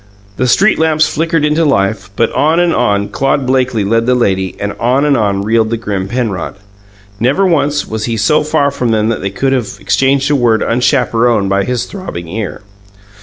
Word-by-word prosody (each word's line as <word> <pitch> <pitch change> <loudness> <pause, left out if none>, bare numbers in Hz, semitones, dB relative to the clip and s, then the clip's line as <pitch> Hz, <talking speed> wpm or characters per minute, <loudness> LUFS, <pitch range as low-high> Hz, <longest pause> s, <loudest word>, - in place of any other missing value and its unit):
The 130 - 0
street 195 - +3
lamps 155 -1 +2
flickered 165 -1 0
into 150 +2 +1
life, 100 -8 0
but 115 +2 +1
on 160 +3 +2
and 175 -1 +2
on 100 -4 0
Claude 135 0 0
Blakely 130 -4 0
led 115 +3 0
the 125 - +3
lady, 95 -6 0
and 100 0 -3
on 125 +5 +1
and 145 -2 +3
on 100 -4 0
reeled 110 +1 +1
the 115 - -1
grim 100 -4 -3
Penrod. 110 -6 -3 0.6
Never 135 - +2
once 145 -4 +1
was 110 -1 -3
he 115 -1 -2
so 150 +9 +2
far 145 -1 +1
from 125 -3 -2
them 110 -1 +1
that 115 - -2
they 95 - -2
could 135 +7 -1
have 125 -6 -3
exchanged 135 +7 +1
a - - +3
word 120 -4 +2
unchaperoned 120 -4 +1
by 100 0 +1
his 125 -1 -2
throbbing 185 - -7
ear. 105 +1 -5
120 Hz, 195 wpm, -13 LUFS, 105-140 Hz, 0.6 s, street